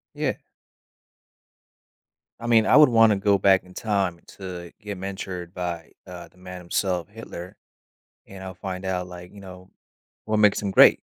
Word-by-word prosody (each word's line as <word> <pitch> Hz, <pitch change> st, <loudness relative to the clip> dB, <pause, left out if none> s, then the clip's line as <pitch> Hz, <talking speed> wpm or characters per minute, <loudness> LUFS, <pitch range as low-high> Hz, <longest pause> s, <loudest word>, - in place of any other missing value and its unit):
Yeah. -, -, -1 dB, 2.0 s
I 120 Hz, -, -6 dB
mean, 115 Hz, -2 st, +5 dB
I -, -, +5 dB
would 150 Hz, -2 st, +8 dB
wanna 115 Hz, -2 st, +5 dB
go 100 Hz, 0 st, +3 dB
back 95 Hz, -1 st, +4 dB
in 90 Hz, 0 st, -16 dB
time 95 Hz, -6 st, -1 dB, 0.2 s
to 90 Hz, -3 st, -7 dB
get 105 Hz, -3 st, -6 dB
mentored 95 Hz, -2 st, -6 dB
by, 85 Hz, -3 st, -5 dB, 0.2 s
uh, 90 Hz, -1 st, -9 dB
the 90 Hz, -, -27 dB
man 90 Hz, 0 st, -9 dB
himself, 90 Hz, -1 st, -1 dB
Hitler, 100 Hz, -4 st, -9 dB, 0.7 s
and 95 Hz, -1 st, -10 dB
I'll 95 Hz, -1 st, -7 dB
find 95 Hz, 0 st, -6 dB
out, 90 Hz, -1 st, -2 dB
like, 90 Hz, 0 st, -11 dB
you 100 Hz, -, -12 dB
know, 95 Hz, -1 st, -12 dB, 0.6 s
what 110 Hz, 0 st, 0 dB
makes 105 Hz, -1 st, +4 dB
him 100 Hz, -, -2 dB
great. -, -, +7 dB
95 Hz, 165 wpm, -24 LUFS, 90-100 Hz, 2.0 s, would